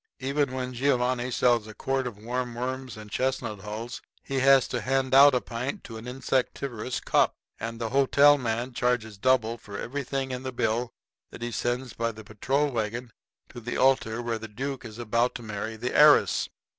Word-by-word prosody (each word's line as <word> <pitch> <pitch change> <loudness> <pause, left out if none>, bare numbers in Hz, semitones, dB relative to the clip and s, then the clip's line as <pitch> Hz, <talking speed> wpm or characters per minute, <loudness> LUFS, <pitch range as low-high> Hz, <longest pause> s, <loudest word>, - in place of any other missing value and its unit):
Even 140 +1 0
when 130 -1 -4
Giovanni 125 -1 +1
sells 120 -3 +2
a 110 - -10
quart 135 +1 -1
of 115 -5 -7
warm 120 +2 -3
worms 130 0 -4
and 105 -1 -10
chestnut 130 -5 -1
hulls 110 +4 -6 0.2
he 135 -1 -2
has 135 0 +5
to 125 - -2
hand 130 +3 0
out 140 0 +8
a 125 - +2
pint 125 +4 -4
to 115 - -8
an 110 +2 -9
insectivorous 130 -1 -2
cop. - - +2 0.2
And 115 +1 -5
the 115 -1 -2
hotel 140 +2 +5
man 120 +1 -2
charges 120 -4 -1
double 120 -1 +2
for 100 -3 -8
everything 135 +1 -3
in 125 0 -4
the 130 0 -4
bill 120 0 -1 0.4
that - - -9
he 120 - -3
sends 120 +1 -2
by 115 0 -1
the 110 0 -11
patrol 135 +7 0
wagon 115 +1 -3 0.4
to - - -9
the 120 +1 -4
altar 120 -3 +2
where 115 -1 -2
the 110 - -7
duke 135 +4 -5
is 110 -1 -9
about 120 +1 0
to 120 - -6
marry 110 +1 -4
the 120 +3 -4
heiress. 150 0 +6
125 Hz, 190 wpm, -27 LUFS, 115-130 Hz, 0.4 s, out